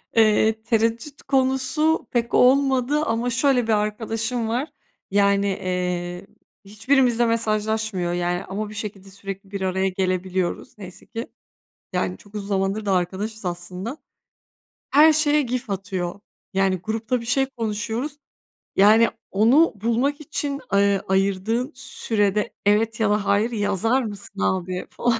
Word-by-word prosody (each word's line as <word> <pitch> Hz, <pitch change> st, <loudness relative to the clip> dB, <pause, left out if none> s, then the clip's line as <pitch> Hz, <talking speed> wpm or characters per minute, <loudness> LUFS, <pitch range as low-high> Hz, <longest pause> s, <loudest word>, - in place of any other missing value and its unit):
Eee, 220 Hz, 0 st, +4 dB
tereddüt 230 Hz, +5 st, 0 dB
konusu 270 Hz, +4 st, +1 dB
pek 235 Hz, -1 st, -1 dB
olmadı 270 Hz, +2 st, +4 dB
ama 230 Hz, +2 st, 0 dB
şöyle 250 Hz, +1 st, +2 dB
bir -, -, +1 dB
arkadaşım 225 Hz, +2 st, -1 dB
var. 250 Hz, +7 st, -1 dB, 0.4 s
Yani, 200 Hz, 0 st, +3 dB
eee, 180 Hz, -1 st, -3 dB, 0.4 s
hiçbirimizle 240 Hz, +3 st, +2 dB
mesajlaşmıyor. 220 Hz, -4 st, 0 dB
Yani, 175 Hz, 0 st, -1 dB
ama 205 Hz, +2 st, -4 dB
bir 215 Hz, -, -9 dB
şekilde 200 Hz, -2 st, -7 dB
sürekli 195 Hz, 0 st, -8 dB
bir 200 Hz, -, -4 dB
araya 190 Hz, 0 st, 0 dB
gelebiliyoruz. 185 Hz, 0 st, -2 dB
Neyse 185 Hz, -3 st, -11 dB
ki. 230 Hz, +2 st, -6 dB, 0.7 s
Yani 180 Hz, 0 st, -1 dB
çok 205 Hz, +1 st, -19 dB
uzun 200 Hz, -1 st, -5 dB
zamandır 195 Hz, +2 st, 0 dB
da 195 Hz, -, +2 dB
arkadaşız 195 Hz, +4 st, -2 dB
aslında. 180 Hz, -, -5 dB, 1.0 s
Her 305 Hz, +3 st, +7 dB
şeye 300 Hz, -1 st, +3 dB
GIF 250 Hz, -3 st, -3 dB
atıyor. 190 Hz, -2 st, -3 dB, 0.3 s
Yani 190 Hz, 0 st, +2 dB
grupta 225 Hz, +3 st, -1 dB
bir -, -, -8 dB
şey 270 Hz, +3 st, +2 dB
konuşuyoruz. 225 Hz, +6 st, -3 dB, 0.6 s
Yani 220 Hz, +4 st, +6 dB, 0.2 s
onu 245 Hz, +12 st, +4 dB
bulmak 235 Hz, +8 st, 0 dB
için, 290 Hz, -2 st, -3 dB
eee, 200 Hz, 0 st, +3 dB
ayırdığın 200 Hz, +7 st, 0 dB
sürede 210 Hz, -5 st, -1 dB
evet 215 Hz, +3 st, +2 dB
ya 220 Hz, -2 st, +2 dB
da 210 Hz, -1 st, +1 dB
hayır 210 Hz, +5 st, +2 dB
yazar 225 Hz, +4 st, +1 dB
mısın 205 Hz, -2 st, -7 dB
abi 185 Hz, -1 st, -1 dB
falan. 235 Hz, -1 st, 0 dB
215 Hz, 130 wpm, -23 LUFS, 195-240 Hz, 1.0 s, Her